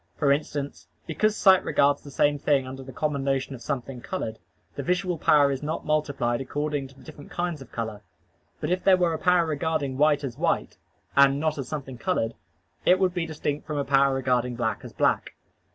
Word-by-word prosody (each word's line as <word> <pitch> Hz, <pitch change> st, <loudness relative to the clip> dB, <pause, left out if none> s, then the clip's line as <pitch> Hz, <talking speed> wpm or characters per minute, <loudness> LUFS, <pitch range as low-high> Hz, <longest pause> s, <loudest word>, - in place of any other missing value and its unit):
For 145 Hz, -3 st, +3 dB
instance, 145 Hz, 0 st, -2 dB, 0.2 s
because 215 Hz, +6 st, +1 dB
sight 190 Hz, -2 st, +6 dB
regards 140 Hz, 0 st, +2 dB
the 145 Hz, -, -11 dB
visible 145 Hz, +1 st, +2 dB
thing 140 Hz, -2 st, +2 dB
under 130 Hz, +1 st, -7 dB
the 130 Hz, 0 st, -9 dB
common 140 Hz, +1 st, -2 dB
notion 135 Hz, 0 st, -1 dB
of 125 Hz, -, -9 dB
something 125 Hz, -1 st, -4 dB
colored, 110 Hz, -11 st, -4 dB, 0.3 s
the -, -, -4 dB
visual 180 Hz, +2 st, -1 dB
power 145 Hz, -2 st, +5 dB
is 135 Hz, -, -3 dB
not 155 Hz, +2 st, -3 dB
multiplied 140 Hz, -5 st, 0 dB
according 145 Hz, +1 st, -2 dB
to 135 Hz, -, -19 dB
the -, -, -17 dB
different 150 Hz, -2 st, -12 dB
kinds 175 Hz, -4 st, -3 dB
of 135 Hz, -, -12 dB
color: 110 Hz, -3 st, -4 dB, 0.6 s
but -, -, -2 dB
if 180 Hz, 0 st, 0 dB
there 190 Hz, -1 st, +6 dB
were 175 Hz, -2 st, +2 dB
a 160 Hz, -, -3 dB
power 180 Hz, -2 st, +3 dB
regarding 155 Hz, -3 st, -2 dB
white 150 Hz, -1 st, +4 dB
as 125 Hz, -4 st, -5 dB
white, -, -, -1 dB, 0.4 s
and 140 Hz, 0 st, +5 dB
not 155 Hz, -1 st, -1 dB
as 135 Hz, -, -4 dB
something 135 Hz, -4 st, -6 dB
colored, 115 Hz, 0 st, 0 dB, 0.5 s
it 180 Hz, -, +5 dB
would 185 Hz, -1 st, +1 dB
be 175 Hz, -2 st, -2 dB
distinct 150 Hz, -2 st, -3 dB
from 150 Hz, -, -3 dB
a 140 Hz, -, -1 dB
power 135 Hz, 0 st, +3 dB
regarding 125 Hz, -2 st, 0 dB
black 115 Hz, -2 st, -2 dB
as -, -, -9 dB
black. -, -, 0 dB
145 Hz, 205 wpm, -26 LUFS, 135-155 Hz, 0.6 s, sight